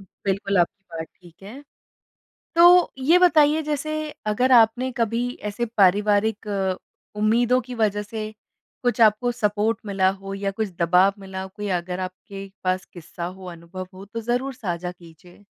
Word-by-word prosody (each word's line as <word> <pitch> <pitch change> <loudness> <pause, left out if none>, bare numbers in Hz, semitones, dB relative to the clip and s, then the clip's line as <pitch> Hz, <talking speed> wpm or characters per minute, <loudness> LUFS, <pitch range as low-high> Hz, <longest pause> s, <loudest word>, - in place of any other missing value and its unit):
बिल्कुल, 195 0 -3
आपकी 195 +3 0
बात 160 -1 -5
ठीक 175 +1 -19
है। 240 +9 -10 0.9
तो 350 +1 +6
ये 340 +5 +6
बताइए, 315 -3 +4
जैसे 305 +1 -3 0.3
अगर 245 +5 +2
आपने 240 +2 +4
कभी 230 +2 0 0.2
ऐसे 220 +4 -2
पारिवारिक 205 +2 +3 0.7
उम्मीदों 235 +4 +3
की 250 +1 -8
वज़ह 210 -2 0
से 215 +1 -6 0.5
कुछ 245 -1 0
आपको 225 +2 +4
सपोर्ट 215 -1 0
मिला 195 -2 +2
हो, 195 0 -7
या 195 0 -2
कुछ 210 +1 -3
दबाव 180 +3 +4
मिला, 190 -1 -7
कोई 205 +2 -7
अगर 180 +1 -6
आपके 195 +1 -8
पास 185 0 0
किस्सा 175 0 -8
हो, 185 +1 -9
अनुभव 170 +2 -9
हो, 190 +1 -10
तो 230 +3 -6
ज़रूर 245 +4 -2
साझा 180 -6 -4
कीजिए? 175 +3 -18
205 Hz, 150 wpm, -23 LUFS, 185-240 Hz, 0.9 s, तो